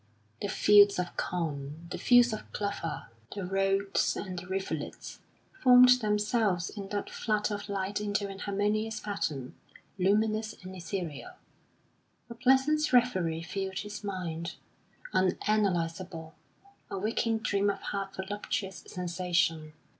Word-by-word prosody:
The - - -1
fields 205 0 +6
of 180 -1 -3
corn, 155 -2 -3
the - - -4
fields 245 -1 +5
of 215 - -7
clover, 200 - -3 0.3
the 200 -3 -3
roads 195 +1 +1
and 185 -3 -4
the 180 - -10
rivulets, 190 +1 -4 0.4
formed 250 -1 +8
themselves 210 -3 +1
in 200 -2 -7
that 205 0 -2
flood 215 -2 -1
of 205 0 -4
light 200 +1 -2
into 205 -1 -1
an 195 0 -8
harmonious 210 +2 -1
pattern, 150 -11 -3 0.5
luminous 215 +3 +1
and 185 +1 -8
ethereal. 170 -4 -5 1.0
A - - -4
pleasant 270 +5 +3
reverie 185 -10 +2
filled 190 +1 -4
his 210 +1 -5
mind, 175 -4 -4 0.6
unanalysable, 180 -4 0 0.6
a - - -4
waking 225 +3 0
dream 205 -3 +1
of 200 - -2
half 195 -1 -4
voluptuous 190 -1 -4
sensation. 170 -3 -1
195 Hz, 125 wpm, -30 LUFS, 180-210 Hz, 1.0 s, formed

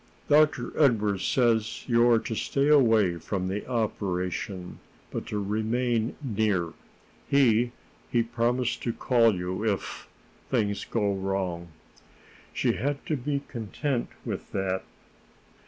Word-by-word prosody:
"Dr. 150 -4 +3
Edwardes 105 -8 +3
says 115 -3 +1
you 120 -1 +4
are 115 - +6
to 115 - -3
stay 140 +6 0
away 115 - +5
from 95 +1 -3
the 100 +2 -3
operation, 95 -5 -2 0.3
but - - -4
to 105 - -3
remain 110 +3 0
near. 105 -8 0 0.6
He 120 -4 +4 0.4
he 120 -1 +2
promises 120 +1 0
to 120 - -3
call 115 -4 +3
you 90 +3 -3
if 105 -3 -2 0.4
things 100 -1 0
go 105 -3 0
wrong." 95 -3 -2 0.8
She - - +1
had 140 +6 -2
to 155 - 0
be 140 +1 -2
content 120 +3 -2 0.2
with - - -5
that. 95 -1 -1
110 Hz, 120 wpm, -27 LUFS, 100-125 Hz, 0.8 s, are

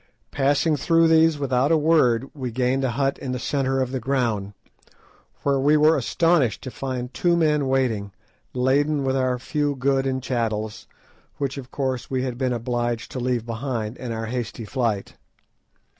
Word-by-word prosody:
Passing 145 +3 +2
through 165 +3 +3
these 160 -1 +5
without 135 0 +1
a 165 - +5
word, 140 -6 +2
we 130 -4 -4
gained 125 +3 0
a 130 - +1
hut 135 +2 -1
in 130 -2 -4
the - - -2
centre 135 +1 -1
of 130 -1 -1
the 130 - -2
ground, 115 -6 -1 0.9
where 140 -1 +2
we 145 +3 +4
were 155 +2 +5
astonished 140 - +1
to 130 - -6
find 130 -1 -4
two 175 -1 +2
men 150 -4 +2
waiting, 120 -7 0 0.4
laden 140 +3 +1
with 135 0 0
our 130 -1 +1
few 145 +3 -1
goods 135 +1 +1
and 130 -1 -2
chattels, 110 -4 -2 0.5
which 140 -2 -2
of 130 -2 -10
course 130 -3 -3
we 130 -1 -1
had 125 -2 -4
been 130 -2 0
obliged 120 -1 -2
to 130 - -4
leave 125 -2 -1
behind 115 -1 -3
in 125 -2 -5
our 115 0 -3
hasty 115 -1 -4
flight. 110 -4 -2
130 Hz, 175 wpm, -23 LUFS, 120-140 Hz, 0.9 s, these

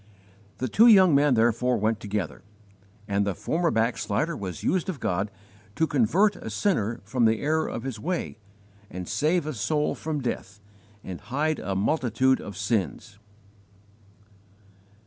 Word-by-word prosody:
The 130 - -2
two 220 - +5
young 190 -7 +7
men 140 -1 +4
therefore 120 +2 +2
went 110 +1 0
together, 100 -7 -4 0.7
and 100 -1 +1
the 100 -2 -2
former 170 - 0
backslider 115 +6 0
was 95 - -6
used 185 0 0
of 165 -7 -4
God 95 0 -1 0.5
to 160 - +2
"convert 160 - +2
a - - -7
sinner 120 - 0
from 120 +4 +1
the 110 0 +3
error 155 +2 0
of 115 - -5
his 130 -5 -5
way 175 -3 -3 0.5
and 90 0 -7
save 160 +2 +1
a 155 - -3
soul 150 +6 0
from 155 -1 -4
death 105 -5 -4 0.4
and 90 -2 -7
hide 150 +5 -1
a 95 +1 -3
multitude 130 +3 +1
of 100 -3 -8
sins." 100 0 -2
125 Hz, 145 wpm, -26 LUFS, 105-155 Hz, 0.7 s, young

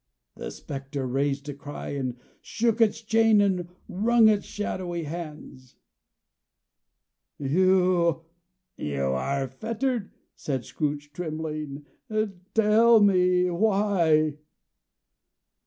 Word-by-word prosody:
The - - -6
spectre 135 -1 -6
raised 140 +2 -1
a 145 - -4
cry, 145 +1 -8
and 130 -3 -3 0.2
shook 230 0 0
its 225 +1 +2
chain 225 -1 +4
and 185 -4 +1 0.2
wrung 225 +3 +4
its 210 -1 +1
shadowy 180 -4 -4
hands. 150 -5 -8 1.6
"You 175 +2 +2 0.6
are 70 - -1
fettered," 225 - -3 0.3
said 135 -4 -3
Scrooge, 145 -1 -3
trembling. 155 -3 -5 0.7
"Tell 225 +1 +6
me 180 -3 +3
why?" 170 -6 +2
170 Hz, 90 wpm, -26 LUFS, 145-205 Hz, 1.6 s, Tell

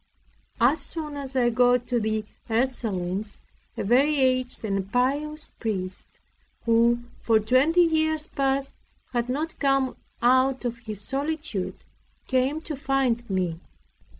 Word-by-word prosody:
As 260 +7 +4
soon 300 0 -4
as 270 -2 -5
I 240 -2 +3
got 245 +1 +3
to 245 -2 0
the 215 -1 -1 0.2
Ursulines, 215 -5 -1 0.4
a - - -1
very 275 +8 +3
aged 255 -3 +1
and 195 -1 -2
pious 290 +5 0
priest, 190 -5 -4 0.5
who 235 +1 +3 0.2
for 225 -2 +4
twenty 260 +11 +4
years 315 -2 +1
past 275 -1 -1 0.4
had 240 0 0
not 310 +5 -3
come 275 -2 +2 0.2
out 255 +1 +3
of 235 -1 -2
his 215 -4 -7
solitude, 280 - -3 0.4
came 260 +4 +1
to 315 -2 -5
find 265 -4 0
me. 180 -4 -1
255 Hz, 125 wpm, -26 LUFS, 230-275 Hz, 0.5 s, As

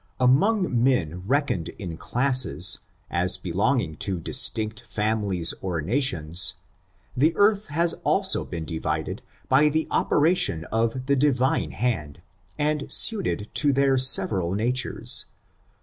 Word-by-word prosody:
Among 135 - +1
men 90 - 0
reckoned 130 - -1
in 90 -5 -7
classes, 125 -6 +1 0.3
as 90 +2 +1
belonging 95 - -2
to 95 0 -2
distinct 110 +3 +1
families 105 -5 -1
or 90 -3 -3
nations, 90 - 0 0.6
the 155 +6 +2
earth 205 0 +2
has 165 +3 +1
also 195 -1 +2
been 85 -3 -7
divided 80 0 -4 0.3
by 145 +3 +3
the 155 +1 -2
operation 150 - +1
of 115 +3 -2
the 140 +1 +1
Divine 130 -2 0
hand, 85 - -4 0.4
and 150 0 -2
suited 195 - +3
to 145 -2 +3
their 135 0 +2
several 95 -8 +3
natures. 125 +4 0
120 Hz, 120 wpm, -23 LUFS, 90-140 Hz, 0.6 s, by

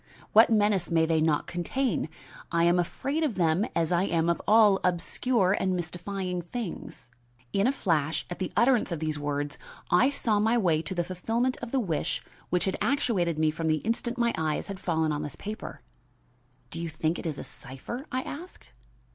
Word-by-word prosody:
What 220 +2 +8
menace 205 -5 +2
may 165 -1 +3
they 160 -1 +2
not 155 -2 +2
contain? 175 - -1 0.4
I 170 0 +2
am 175 +1 +4
afraid 275 - -1
of 295 -9 0
them, 175 +4 +2
as 165 -1 +1
I 175 +2 +3
am 165 -2 +1
of 170 - -2
all 210 -2 +6
obscure 185 +3 +1
and 185 -1 +1
mystifying 180 +1 -3
things." 175 - -7 0.4
In 200 +4 +3
a - - +4
flash, 160 - 0
at 175 - -7
the 185 - -2
utterance 240 -4 +3
of 170 - -1
these 155 -1 -2
words, 145 0 -2 0.3
I 215 +10 +5
saw, 230 -7 +1
my 225 +3 +3
way 170 -8 +2
to 190 +3 -5
the 175 - +1
fulfillment 225 +8 -1
of 240 - -7
the 270 - +2
wish 175 -6 -1 0.3
which 180 - +1
had 190 - -1
actuated 210 - +1
me 155 0 +3
from 160 +1 -3
the 155 0 +3
instant 235 +2 -1
my 235 -1 +2
eyes 155 +2 -1
had 195 -1 -5
fallen 160 -4 0
on 150 0 -2
this 145 - -5
paper. 210 +2 -7 0.9
"Do 165 - -4
you 170 - -3
think 160 +2 -1
it - - -4
a 150 -3 -4
cipher?" 135 - -8
I 255 +1 -1
asked. 345 +6 -9
180 Hz, 190 wpm, -28 LUFS, 160-225 Hz, 0.9 s, What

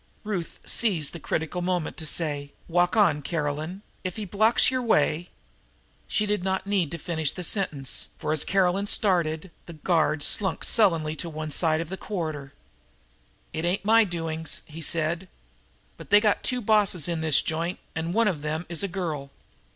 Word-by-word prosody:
Ruth 195 -6 -4
seized 180 -11 0
the 170 - -6
critical 160 +3 -2
moment 180 -2 -1
to 160 - -4
say: 145 -3 -1
"Walk 175 +4 +2
on, 170 -9 +4
Caroline. 155 +5 -3 0.2
If 185 -2 -3
he 215 - -4
blocks 215 +7 +3
your 255 -1 0
way 170 -6 +2 0.4
" - - -36
She 210 - +1
did 210 -3 0
not 190 0 -1
need 195 -6 +1
to 170 - -5
finish 160 -2 -1
the 180 - -5
sentence, 155 - 0
for, 155 - -1
as 155 - +2
Caroline 195 +1 +2
started 170 -7 +2
on, 185 - -15 0.2
the 170 - -8
guard 155 -1 +1
slunk 190 +3 0
sullenly 165 -8 +3
to 170 - -4
one 155 -1 -5
side 160 +1 +3
of 165 - -6
the 190 - -4
corridor. 155 -9 -4 1.0
"It 160 - -3
ain't 180 +3 0
my 225 +1 +6
doings," 165 -4 -4
he 160 +1 -9
said. 165 +3 -1 0.7
"But - - -11
they 205 - +8
got 210 -1 +2
two 250 -1 0
bosses 205 -7 +3
in 170 -2 -2
this 155 -3 +5
joint, 165 +3 -2 0.2
and 165 +1 -2
one 230 +3 +3
of 170 -8 -1
them 155 +3 -3
is 170 -2 -2
a 200 - 0
girl. 165 -7 -4
170 Hz, 180 wpm, -26 LUFS, 155-195 Hz, 1.0 s, they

